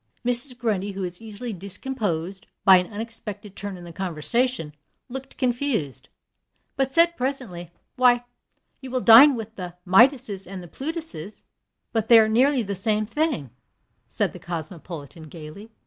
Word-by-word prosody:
Mrs. 245 +1 +3
Grundy, 205 -4 -2
who 195 0 -5
is 175 +1 -2
easily 225 +1 -6
discomposed 195 -2 -3 0.2
by 190 -1 +9
an 180 +2 -2
unexpected 215 -2 -6
turn 200 -1 -6
in 175 - -12
the 170 -1 -10
conversation, 185 +2 -1 0.4
looked 265 +1 -8
confused, 240 - -2 0.7
but 270 -1 0
said, 340 +3 +4
presently, 250 - -4 0.3
"Why, 245 -1 +4 0.6
you 265 - -8
will 255 0 -1
dine 250 +5 +8
with 225 -1 -7
the 180 -2 -7
Midases 205 -1 +3
and 190 -2 -7
the - - -11
Plutuses." 270 - -5 0.5
"But 225 -2 0
they 235 - +8
are 220 -1 +6
merely 255 +4 +3
the 200 -1 -4
same 210 +2 0
thing," 255 - -2 0.6
said - - -1
the - - -10
cosmopolitan, 165 -2 -8
gayly. 165 +8 -11
215 Hz, 145 wpm, -24 LUFS, 180-250 Hz, 0.7 s, by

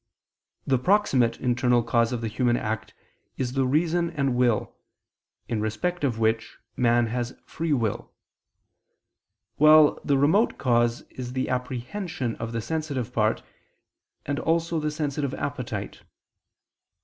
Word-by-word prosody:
The 130 -2 +2
proximate 140 - +2
internal 120 -1 +2
cause 115 0 +2
of 120 -2 -3
the 115 - -2
human 120 +2 +1
act 110 0 -4 0.4
is 125 -2 -2
the 135 -1 +1
reason 170 +4 +1
and 140 -6 -1
will, 120 -3 +1 0.7
in 110 -2 -2
respect 145 +12 -2
of 125 -5 0
which 110 0 0 0.2
man 120 -1 +3
has 120 +1 -2
a - - -15
free 165 0 -4
will; 115 -7 -1 1.5
while 155 0 +6
the 140 - +2
remote 160 - +3
cause 120 -2 +2
is 125 -1 -7
the 130 0 -1
apprehension 130 - -3
of 115 0 -5
the 115 -1 -2
sensitive 140 -4 -3
part, 110 -2 +1 0.8
and 145 0 -2
also 165 0 0
the 150 0 -1
sensitive 145 -2 -2
appetite. 125 -8 -5
125 Hz, 135 wpm, -25 LUFS, 120-150 Hz, 1.5 s, while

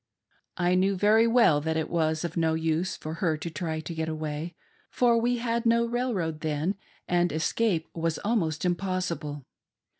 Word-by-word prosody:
" - - -42
I 175 0 +2
knew 190 +2 +2
Very 215 +4 +4
well 230 -11 +4
that 160 +1 -1
it 160 - -1
was 160 -1 0
of 170 - -5
no 160 -1 +2
use 165 +3 -1
for 155 - -6
her 160 -5 +1
to 170 - -5
try 160 -2 -3
to 160 +2 -6
get 160 0 -2
away, 155 +1 -4 0.3
for 240 -2 +3
we 245 +1 +1
had 235 0 -1
no 235 0 +3
railroad 230 -10 -1
then, 155 +4 -1 0.3
and 175 0 +2
escape 165 +2 0
was 165 -1 -1
almost 180 -8 0
impossible. 175 -6 -2
170 Hz, 175 wpm, -27 LUFS, 160-205 Hz, 0.3 s, Very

